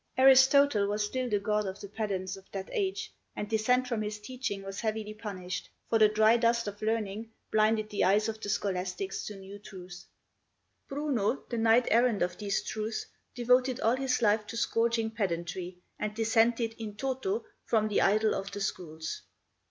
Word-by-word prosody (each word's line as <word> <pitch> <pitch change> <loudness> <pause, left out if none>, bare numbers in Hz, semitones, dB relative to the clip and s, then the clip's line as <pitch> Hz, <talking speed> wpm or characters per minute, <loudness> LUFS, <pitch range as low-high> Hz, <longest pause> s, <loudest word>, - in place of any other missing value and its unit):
Aristotle 265 -4 +6
was 210 +1 0
still 255 +3 -2
the 210 - +2
god 210 0 0
of 190 +1 -5
the 200 - -7
pedants 195 -3 -3
of 195 0 -15
that 195 -1 -5
age, 390 -3 -2 0.2
and 210 - -3
dissent 250 +4 +2
from 235 -3 -1
his 210 0 -4
teaching 210 -3 -4
was 195 0 -6
heavily 215 -1 -2
punished, 190 -4 -6 0.2
for 225 - +4
the 215 -1 +7
dry 215 +2 +5
dust 235 -1 +2
of 205 0 -6
learning 220 0 -2 0.2
blinded 215 0 +2
the 205 - +1
eyes 205 +3 +3
of 220 0 -4
the 205 - -4
scholastics 190 -1 -2
to 210 - -6
new 195 +1 -10
truths. 185 -3 -11 0.8
Bruno, 275 -5 -1
the 235 - -1
knight 230 +2 +4
errant 230 -3 +4
of 180 0 -2
these 200 -2 -1
truths, 220 +1 -3 0.3
devoted 250 +1 +3
all 230 +3 +3
his 260 -2 0
life 210 0 +3
to 230 - -6
scourging 230 -1 +1
pedantry, 180 -3 -3 0.2
and 210 0 -3
dissented 225 +1 +2
in 215 -2 -6
toto 270 - -2 0.2
from 215 -2 +2
the 210 - +1
idol 215 +2 +3
of 195 +1 -4
the 205 - -4
schools. 160 -5 -4
215 Hz, 175 wpm, -30 LUFS, 200-235 Hz, 0.8 s, the